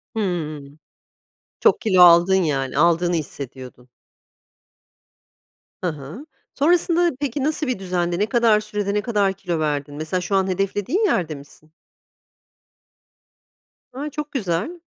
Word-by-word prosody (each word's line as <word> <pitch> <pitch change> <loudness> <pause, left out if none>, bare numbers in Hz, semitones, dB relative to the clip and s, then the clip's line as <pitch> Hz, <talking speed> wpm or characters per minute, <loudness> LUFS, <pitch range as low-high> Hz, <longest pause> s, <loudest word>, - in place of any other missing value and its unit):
Hıı. 170 -8 -2 1.0
Çok - - +3
kilo 190 -6 +3
aldın 175 +2 +7
yani, 140 -8 -1
aldığını 175 +1 +3
hissediyordun. 130 -4 -7 1.9
Hı - - +1
hı. 155 - -9 0.3
Sonrasında 340 +3 +2
peki, 285 -1 -2
nasıl 305 0 -1
bir 255 -6 -2
düzendi? 175 -2 -2
Ne 210 - +2
kadar 225 -2 +3
sürede, 210 -1 -3
ne 210 - +1
kadar 205 -4 0
kilo 175 -4 -4
verdin? 145 -2 -2
Mesela 155 +4 -3
şu 195 +2 -2
an 190 -1 +2
hedeflediğin 195 - -1
yerde 165 - 0
misin? 150 +2 -15 2.2
A, 290 +3 -5
çok 300 +1 -6
güzel. 220 - -2
190 Hz, 120 wpm, -21 LUFS, 160-235 Hz, 2.2 s, aldın